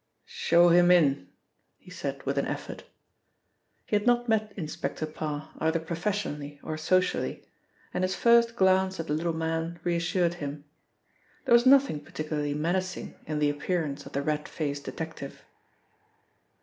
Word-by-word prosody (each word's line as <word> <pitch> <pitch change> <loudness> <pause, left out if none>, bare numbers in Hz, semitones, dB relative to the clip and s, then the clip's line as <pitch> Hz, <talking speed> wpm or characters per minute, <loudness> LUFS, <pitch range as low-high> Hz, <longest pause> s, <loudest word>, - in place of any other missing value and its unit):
"Show 175 +1 +4
him 175 +1 +6
in," 140 - +4 0.5
he 180 - -16
said 140 -6 -5
with 140 0 0
an - - -1
effort. - - -6 1.0
He - - -1
had 205 +3 +1
not 240 0 +3
met 215 -1 +1
Inspector 155 -3 -4
Parr 155 -1 -5
either 160 +1 +1
professionally 160 -4 -3
or 155 - -4
socially, 180 +4 0 0.5
and 180 - -1
his 185 0 0
first 235 0 +4
glance 190 -2 +3
at 165 - -2
the 150 - -2
little 165 +2 0
man 165 +1 -2
reassured 175 0 +1
him. 145 0 -5 0.8
There - - +3
was 240 +2 +6
nothing 270 - +5
particularly 150 0 -3
menacing 185 +4 -2
in 155 - -2
the 150 -1 +2
appearance 145 -1 -3
of - - -12
the 140 - -1
red 150 0 -2
faced 145 -2 -3
detective. 160 -4 -7
165 Hz, 150 wpm, -28 LUFS, 150-185 Hz, 1.0 s, him